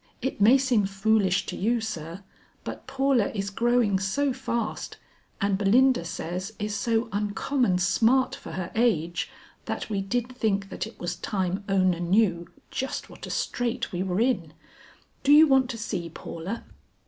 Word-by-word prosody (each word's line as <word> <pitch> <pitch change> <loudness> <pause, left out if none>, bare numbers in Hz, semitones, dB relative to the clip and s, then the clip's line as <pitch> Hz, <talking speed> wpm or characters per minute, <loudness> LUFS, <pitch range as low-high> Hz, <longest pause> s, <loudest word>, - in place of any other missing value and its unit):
It 265 -5 -3
may 235 +6 +7
seem 250 -7 +2
foolish 195 -1 +2
to - - -5
you, 235 +5 +1
sir; 180 -4 -6 0.4
but - - -7
Paula 270 -5 +2
is 200 -1 -2
growing 235 -2 +2
so 265 +9 0
fast 235 -4 -3 0.4
and 200 -1 +1
Belinda 240 0 +4
says 180 +4 -4
is 210 0 -3
so 225 +2 0
uncommon 205 +1 0
smart 225 +8 +3
for - - -8
her 180 +1 -4
age 175 -8 +1 0.4
that - - -4
we 200 -2 0
did 245 +5 -2
think 200 -5 0
that - - -4
it 225 - -14
was 175 0 -3
time 190 +1 -2
Ona 185 -3 +2
knew 175 -1 +2 0.2
just 265 - -4
what - - -9
a - - -8
straight 245 -1 -2
we 180 -2 -2
were 185 0 -1
in. 220 - +1 0.7
Do 280 - +3
you 305 +2 +9
want 265 -2 +4
to 235 - -4
see 190 -6 -4
Paula?" 170 +6 -6
210 Hz, 160 wpm, -26 LUFS, 185-245 Hz, 0.7 s, you